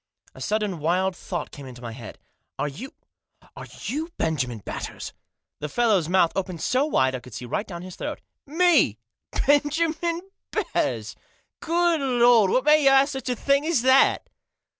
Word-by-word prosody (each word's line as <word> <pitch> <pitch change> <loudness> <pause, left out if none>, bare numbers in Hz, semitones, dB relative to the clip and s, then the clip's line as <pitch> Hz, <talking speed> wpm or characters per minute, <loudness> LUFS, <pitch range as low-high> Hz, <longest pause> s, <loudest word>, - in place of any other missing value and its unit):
A - - -13
sudden 210 -5 -1
wild 180 +4 0
thought 175 0 -5
came 140 -3 -10
into 125 -1 -11
my 115 - -5
head. 115 0 -10 0.2
" - - -53
Are - - -1
you 195 - -8 0.3
— - - -29
are - - -9 0.2
you 310 +5 -3
Benjamin 135 -7 -1
Batters? 100 - -7 0.2
" - - -62
The 150 - -4
fellow's 205 -6 +2
mouth 180 -2 +3
opened 185 -3 -3
so 260 +4 +1
wide 130 - +2
I 130 - -3
could 125 -3 -13
see 125 - -6
right 160 - -3
down 175 -2 -7
his 185 -1 -9
throat. - - -5 0.2
" - - -65 0.2
Me 310 - +4 0.5
Benjamin 320 +4 +1 0.3
Batters! - - -2 0.4
Good 340 -1 +1
Lord! 240 -5 +4
What 255 - +2
made 300 0 +4
you - - +8
ask 270 +1 +4
me 265 - -3
such 255 - -6
a 250 - 0
thing 280 +3 +1
as 325 -8 +1
that 260 +1 +4
220 Hz, 185 wpm, -24 LUFS, -, 0.5 s, you